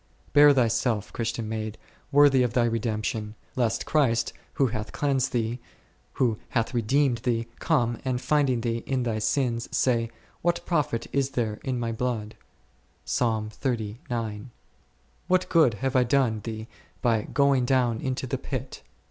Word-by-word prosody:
Bear 145 Hz, 0 st, +8 dB
thyself, 115 Hz, -4 st, +1 dB
Christian 115 Hz, -1 st, -2 dB
maid, 110 Hz, -1 st, -4 dB, 0.3 s
worthy 140 Hz, -2 st, +6 dB
of 120 Hz, -2 st, +1 dB
thy 120 Hz, -1 st, +3 dB
redemption, 110 Hz, -1 st, -2 dB, 0.2 s
lest 120 Hz, -3 st, 0 dB
Christ, 130 Hz, -7 st, +2 dB, 0.2 s
who 135 Hz, -, +2 dB
hath 110 Hz, -3 st, -3 dB
cleansed 135 Hz, -3 st, 0 dB
thee, 120 Hz, 0 st, -1 dB, 0.5 s
who 115 Hz, -5 st, +1 dB
hath 115 Hz, -1 st, 0 dB
redeemed 125 Hz, +2 st, +2 dB
thee, 115 Hz, -2 st, 0 dB
come, 120 Hz, -8 st, +1 dB
and 130 Hz, -2 st, -1 dB
finding 130 Hz, -2 st, +2 dB
thee 115 Hz, 0 st, -1 dB
in 130 Hz, -2 st, 0 dB
thy 115 Hz, -2 st, -1 dB
sins, 120 Hz, -1 st, 0 dB
say, 115 Hz, -3 st, +1 dB, 0.3 s
What 170 Hz, 0 st, 0 dB
profit 150 Hz, -9 st, 0 dB
is 140 Hz, -1 st, +1 dB
there 110 Hz, -3 st, -1 dB
in 130 Hz, -2 st, -2 dB
My 115 Hz, -1 st, -1 dB
blood? 115 Hz, -2 st, -3 dB, 2.9 s
what 185 Hz, 0 st, +2 dB
good 155 Hz, -9 st, +5 dB
have 135 Hz, +4 st, -2 dB
I 130 Hz, -, +5 dB
done 125 Hz, -3 st, +2 dB
thee 110 Hz, -1 st, -5 dB, 0.4 s
by 115 Hz, -3 st, +3 dB
going 140 Hz, +1 st, +2 dB
down 120 Hz, -3 st, +2 dB
into 130 Hz, 0 st, -2 dB
the 125 Hz, -, -3 dB
pit -, -, -5 dB
120 Hz, 140 wpm, -26 LUFS, 115-135 Hz, 2.9 s, Bear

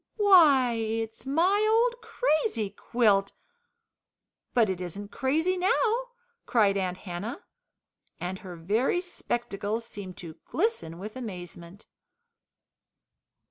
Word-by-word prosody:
"Why, 315 Hz, -, +6 dB
it's 225 Hz, +1 st, -3 dB
my 360 Hz, +9 st, +3 dB
old 475 Hz, +1 st, +2 dB
crazy 415 Hz, -, 0 dB
quilt, 205 Hz, -5 st, +1 dB, 1.2 s
but 230 Hz, -3 st, +3 dB
it 185 Hz, -2 st, -3 dB
isn't 200 Hz, +3 st, -6 dB
crazy 320 Hz, +8 st, +1 dB
now!" 440 Hz, +4 st, +2 dB, 0.5 s
cried 210 Hz, -4 st, +3 dB
Aunt 185 Hz, -2 st, -1 dB
Hannah, 205 Hz, -, -6 dB, 0.8 s
and 185 Hz, +1 st, -4 dB
her 180 Hz, -3 st, -9 dB
very 210 Hz, -, +1 dB
spectacles 230 Hz, -, -3 dB
seemed 195 Hz, -5 st, -8 dB
to 165 Hz, -3 st, -9 dB
glisten 340 Hz, -, -1 dB
with 210 Hz, +5 st, -8 dB
amazement. 180 Hz, -5 st, -8 dB
225 Hz, 100 wpm, -28 LUFS, -, 1.2 s, Why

